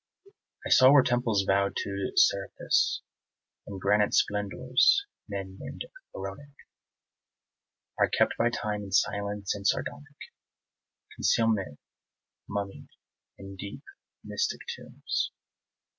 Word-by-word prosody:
I - - -3
saw 130 +1 +8
where 140 -2 +7
temples 120 -5 +1
vowed 100 +1 +2
to 100 -1 -3
Serapis - - +2 0.6
And 100 -2 -6
granite 105 +2 +2
splendours 125 - +2 0.2
men 95 -2 -5
name - - -8 0.3
Pharaonic 100 +10 -8 1.4
Are - - +4
kept - - +2
by 120 - +2
Time 105 -3 -3
in 100 -1 -8
silence 100 +1 0
and 100 -1 -2
sardonic 145 +6 -2 1.0
Concealment 105 -10 +1 0.7
mummied 100 -1 -5 0.5
in 95 0 -10
deep 100 +1 -8 0.4
mystic 465 - -2
tombs. - - -3
100 Hz, 100 wpm, -28 LUFS, 100-120 Hz, 1.4 s, saw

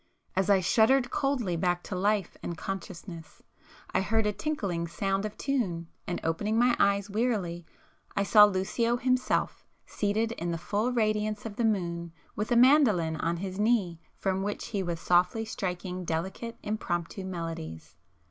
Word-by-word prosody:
As 190 0 +1
I 195 -2 +5
shuddered 245 +7 +3
coldly 255 -10 0
back 175 +1 0
to 190 - -5
life 200 0 0
and 170 - -5
consciousness, 175 -3 -7 0.5
I - - +3
heard 220 +3 +1
a 210 - +1
tinkling 200 - -2
sound 195 +3 -1
of 215 0 -6
tune, 185 -12 -1 0.2
and 175 - -2
opening 205 +7 0
my 240 +1 +4
eyes 200 0 +3
wearily 200 -6 -1 0.5
I 200 - +2
saw 210 +1 +8
Lucio 215 +5 0
himself 255 +1 0 0.2
seated 220 +2 0
in 175 -6 -4
the 170 - -1
full 210 +8 -1
radiance 215 -2 0
of 215 -2 -5
the 235 - 0
moon 170 -5 -1 0.2
with 210 +4 -3
a - - +4
mandoline 235 - +5
on 170 +2 -1
his 190 +2 -5
knee 205 -7 +2 0.2
from 190 -1 0
[p - - -2
377] - - -2
which 205 +1 -3
he 205 -4 -1
was 170 -3 -3
softly 180 +6 +2
striking 185 -3 -4
delicate 190 +8 -3
impromptu 190 -3 -3
melodies. 165 - -6
195 Hz, 165 wpm, -29 LUFS, 175-220 Hz, 0.5 s, saw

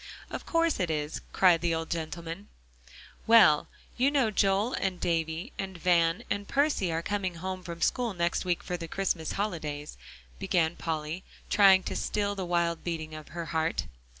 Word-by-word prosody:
"Of - - -6
course 330 -4 +2
it 180 -3 0
is," 150 -1 -2
cried 175 -3 +4
the 170 -1 +1
old 160 0 -4
gentleman. 165 +3 -5 0.8
"Well, 220 -10 +6 0.3
you 260 +3 +4
know 270 -6 +2
Joel 200 +4 +2
and 185 -2 -1
Davie 165 - -1
and 190 -2 -4
Van 170 -1 +2
and 205 0 -3
Percy 280 - +1
are 165 +1 -2
coming 190 -3 -2
home 185 +2 -5
from 170 -2 -5
school 240 -5 0
next 170 0 0
week 180 -2 -1
for 180 - -3
the 165 -1 -6
Christmas 175 -3 -1
holidays," 150 - -4 0.4
began 170 -2 +1
Polly, 160 +2 -3 0.3
trying 195 -2 +6
to - - -4
still 205 -1 -1
the 195 -2 -4
wild 170 -1 0
beating 160 -2 -4
of 155 -1 -8
her 170 +1 -6
heart. 160 +1 0
175 Hz, 170 wpm, -29 LUFS, 165-195 Hz, 0.8 s, Well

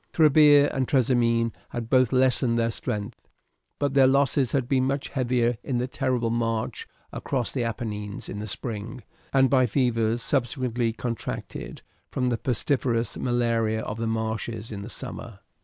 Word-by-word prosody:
Trebia 150 -2 +6
and 130 -2 0
Trasimene 115 -3 +2 0.2
had 120 -2 -5
both 130 0 +3
lessened 130 -2 +3
their 115 0 +1
strength, 105 -1 -5 0.5
but 140 -2 -1
their 135 -1 +6
losses 135 -1 +2
had 135 -3 0
been 130 -1 +2
much 135 +1 -2
heavier 120 -3 0
in 130 - -1
the 125 +1 -1
terrible 125 -3 -1
march 115 -1 -2 0.3
across 125 -4 -2
the 125 - -1
Apennines 105 -3 -4
in 105 - -6
the 105 - -5
spring, 115 +3 -5 0.3
and 135 -1 +4
by 130 -2 +3
fevers 115 -1 +1
subsequently 125 -3 0
contracted 115 0 -5 0.3
from 125 -1 -1
the 120 - 0
pestiferous 120 -2 0
malaria 115 -3 0
of 110 - -5
the 115 - -1
marshes 110 0 -3
in 100 -2 -5
the 105 - -7
summer. 115 -2 -7
120 Hz, 155 wpm, -26 LUFS, 115-130 Hz, 0.5 s, Trebia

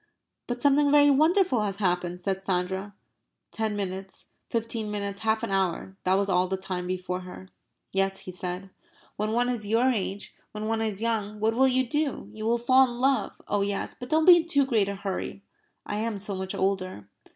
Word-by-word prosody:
"But 245 0 -4
something 285 0 +4
very 290 0 +6
wonderful 315 - +3
has 200 -2 -2
happened," 180 -2 -1
said 190 0 -2
Sandra. 190 +1 -2 0.6
Ten 220 -1 -2
minutes, 190 -1 -5 0.2
fifteen 230 -1 -2
minutes, 200 -1 -3
half 220 0 0
an - - -2
hour 190 0 -1
that 185 +1 +4
was 200 0 +1
all 185 -1 +2
the 190 +1 -2
time 185 -1 -4
before 180 0 -3
her. 185 +1 -10 0.4
"Yes," 195 0 0
he 185 - -7
said. 180 +1 -5 0.4
"When 215 +1 -1
one 240 +2 +2
is 235 -4 -2
your 235 +5 +3
age 200 -3 -3 0.2
when 215 0 -4
one 225 0 0
is 215 -1 -2
young. 215 -2 -1
What 220 +1 +2
will 265 +3 +4
you 260 -1 +2
do? 295 +2 -1
You 215 0 -4
will 235 +1 +3
fall 255 +3 +5
in 240 0 -7
love 270 +1 0
oh 205 - +1
yes! 200 0 -2
But 250 - -9
don't 315 0 +3
be 355 -1 +10
in 335 0 -1
too 285 -4 +3
great 220 -7 +1
a 200 - -3
hurry. 195 0 -4 0.4
I 205 - -3
am 220 -1 -1
so 200 +1 -3
much 190 0 -3
older." 185 - -2
210 Hz, 200 wpm, -27 LUFS, 190-240 Hz, 0.6 s, be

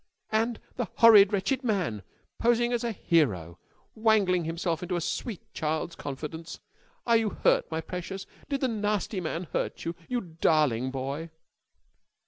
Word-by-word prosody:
And 225 +1 +1 0.2
the 245 -3 -1
horrid, 215 -4 +8
wretched 250 +7 0
man! 185 - 0 0.4
Posing 240 +1 +3
as 240 0 0
a 235 - 0
hero. 100 - +1 0.3
Wangling 205 -6 +3
himself 165 0 -2
into 180 0 -2
the 175 - -1
sweet 205 +4 -3
child's 160 +2 -2
confidence. 150 +4 -6 0.5
Are 235 -1 +5
you 225 -1 +1
hurt, - - +2
my 160 0 -2
precious? 190 +3 -6 0.2
Did 275 -1 -1
the 260 - +2
nasty 210 -3 -1
man 165 +1 -3
hurt - - -2
you? 165 - -1 0.2
You 245 -1 0
darling 155 - +1
boy!" 135 +5 -4
180 Hz, 145 wpm, -28 LUFS, 160-225 Hz, 0.5 s, horrid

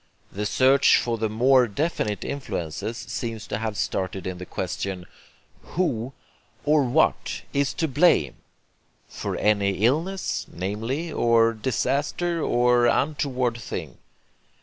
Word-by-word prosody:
The 105 +2 -2
search 130 +5 +5
for 115 -2 -1
the 110 0 0
more 125 +3 +4
definite 105 -3 -2
influences 115 - -4
seems 115 -3 -5
to 100 - -3
have 110 -2 -3
started 95 -1 -2
in 95 -1 -4
the 90 - -8
question: 95 0 -4 0.6
"Who, 130 -8 -2 0.5
or 150 -1 +4
what, 135 +6 +1
is 140 -1 +1
to 160 - 0
blame?" 135 - +3 0.7
for - - -4
any 100 -1 +2
illness, 170 +10 0
namely, 115 - -3
or 115 -3 +3
disaster, 140 - -1
or 120 -2 +3
untoward 130 -3 0
thing. 115 - -6
120 Hz, 120 wpm, -24 LUFS, 105-140 Hz, 0.7 s, search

